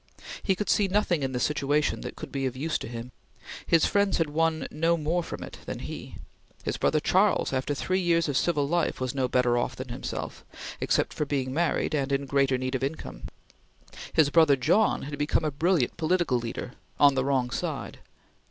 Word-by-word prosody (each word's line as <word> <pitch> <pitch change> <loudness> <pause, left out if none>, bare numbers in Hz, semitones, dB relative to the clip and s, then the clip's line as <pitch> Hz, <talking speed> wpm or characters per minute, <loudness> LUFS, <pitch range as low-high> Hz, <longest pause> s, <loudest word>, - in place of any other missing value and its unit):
He 190 - +1
could 205 +2 -3
see 205 - +3
nothing 185 -5 +1
in 135 -1 -1
the 125 - -2
situation 150 +2 +1
that - - -6
could 155 - -8
be 135 -1 -1
of 130 0 -5
use 155 +4 -1
to - - -6
him. 120 +1 -7 0.6
His 165 -1 +4
friends 200 -1 +2
had 160 -3 0
won 160 0 +1
no 165 +2 +1
more 165 +3 0
from - - -7
it - - -10
than - - -4
he. - - -7 0.5
His - - -2
brother 155 - +2
Charles, 190 0 +2
after 135 +2 -1
three 185 +6 0
years 170 -2 +2
of 145 - -2
civil 145 -2 +1
life, 170 +2 0
was 130 0 -2
no 130 -2 0
better 125 -1 +2
off 125 +1 -2
than 130 0 -7
himself, 120 - -5 0.4
except - - +1
for 150 - -2
being 130 -2 -1
married 165 0 0
and 140 -2 0
in 140 0 0
greater 135 -1 +2
need 130 +1 -3
of 130 - -1
income. 135 - -5 0.9
His 150 -3 +3
brother 160 -3 +6
John 200 - +2
had 145 0 -6
become 150 +2 +1
a 155 - 0
brilliant 155 -2 +1
political 170 -5 +1
leader 120 +1 -5 0.3
on 145 -1 +7
the 130 -1 0
wrong 130 -3 0
side. - - -4
145 Hz, 200 wpm, -27 LUFS, 130-165 Hz, 0.9 s, on